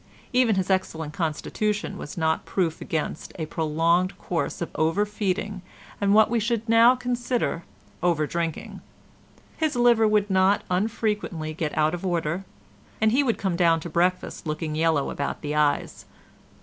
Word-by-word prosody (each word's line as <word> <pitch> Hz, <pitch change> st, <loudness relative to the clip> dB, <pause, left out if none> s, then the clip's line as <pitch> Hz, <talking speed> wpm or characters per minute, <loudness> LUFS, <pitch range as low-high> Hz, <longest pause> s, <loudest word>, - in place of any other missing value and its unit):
Even 245 Hz, -4 st, +4 dB
his 190 Hz, 0 st, 0 dB
excellent 160 Hz, -5 st, -1 dB
constitution 195 Hz, +6 st, -2 dB
was 150 Hz, -, -8 dB
not 160 Hz, -1 st, +1 dB
proof 170 Hz, -4 st, -1 dB
against 155 Hz, -1 st, -3 dB
a 160 Hz, -, -3 dB
prolonged 165 Hz, +4 st, +1 dB
course 170 Hz, -2 st, -3 dB
of 170 Hz, -, -4 dB
overfeeding 200 Hz, +3 st, -1 dB, 0.4 s
and 200 Hz, 0 st, +2 dB
what 220 Hz, 0 st, +6 dB
we 235 Hz, +1 st, 0 dB
should 230 Hz, +1 st, -1 dB
now 230 Hz, +2 st, +6 dB
consider 245 Hz, -7 st, -2 dB, 0.4 s
overdrinking. 165 Hz, -1 st, -1 dB, 0.8 s
His 310 Hz, -3 st, 0 dB
liver 240 Hz, -2 st, +4 dB
would 210 Hz, -1 st, +2 dB
not 190 Hz, +1 st, +3 dB
unfrequently 205 Hz, -5 st, -1 dB
get 155 Hz, -1 st, -3 dB
out 155 Hz, +1 st, +3 dB
of 175 Hz, -, -5 dB
order, 175 Hz, 0 st, -1 dB, 0.5 s
and 220 Hz, 0 st, +3 dB
he 260 Hz, +5 st, +4 dB
would 245 Hz, -5 st, 0 dB
come 190 Hz, -3 st, -1 dB
down 170 Hz, -2 st, +3 dB
to 170 Hz, -, -7 dB
breakfast 180 Hz, 0 st, 0 dB
looking 155 Hz, 0 st, -3 dB
yellow 160 Hz, -2 st, +1 dB
about 140 Hz, -, -3 dB
the 150 Hz, 0 st, -2 dB
eyes. 150 Hz, -1 st, 0 dB
180 Hz, 150 wpm, -25 LUFS, 160-215 Hz, 0.8 s, what